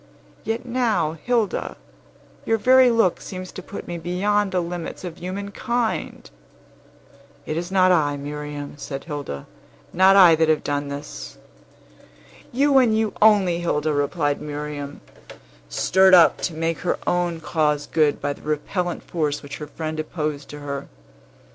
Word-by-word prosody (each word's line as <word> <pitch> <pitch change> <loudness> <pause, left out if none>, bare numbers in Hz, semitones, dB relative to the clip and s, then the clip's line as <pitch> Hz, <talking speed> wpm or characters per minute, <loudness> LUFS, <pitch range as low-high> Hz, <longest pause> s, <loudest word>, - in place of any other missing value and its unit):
Yet 225 +2 -3
now, 230 -10 +1
Hilda, 235 -5 -1 0.7
your 225 - +1
very 255 +3 +6
look 225 -6 +2
seems 185 -1 -7
to - - -8
put 200 - -9
me 175 -1 -5
beyond 195 +4 0
the 185 - +1
limits 175 0 -5
of 175 -3 -7
human 200 +3 -5
kind!" 235 +1 -2 1.2
"It 155 - -3
is 175 +2 -3
not 185 -1 +4
I, 145 -5 +2
Miriam," 145 0 -6
said 135 -1 -6
Hilda; 145 - -6 0.5
"not 190 +2 +6
I 180 -4 +8
that 160 0 +2
have 155 - +2
done 145 0 -2
this." 140 +1 -7 1.1
"You, 275 +2 +4
and 225 -4 +3
you 220 -1 0
only, 200 -5 +5
Hilda," 155 -3 0
replied 145 0 0
Miriam, 145 -1 -6 0.7
stirred 190 - +5
up 170 -2 +6
to 170 - -2
make 165 +1 -1
her 180 - -1
own 175 -2 0
cause 150 -2 0
good 155 -3 +1
by 145 0 -2
the - - -17
repellent 170 +4 -2
force 150 -4 -2
which 140 -1 -7
her 150 - -7
friend 155 +1 -5
opposed 150 -2 -4
to 150 0 -9
her. 140 -1 -5
170 Hz, 150 wpm, -23 LUFS, 150-195 Hz, 1.2 s, I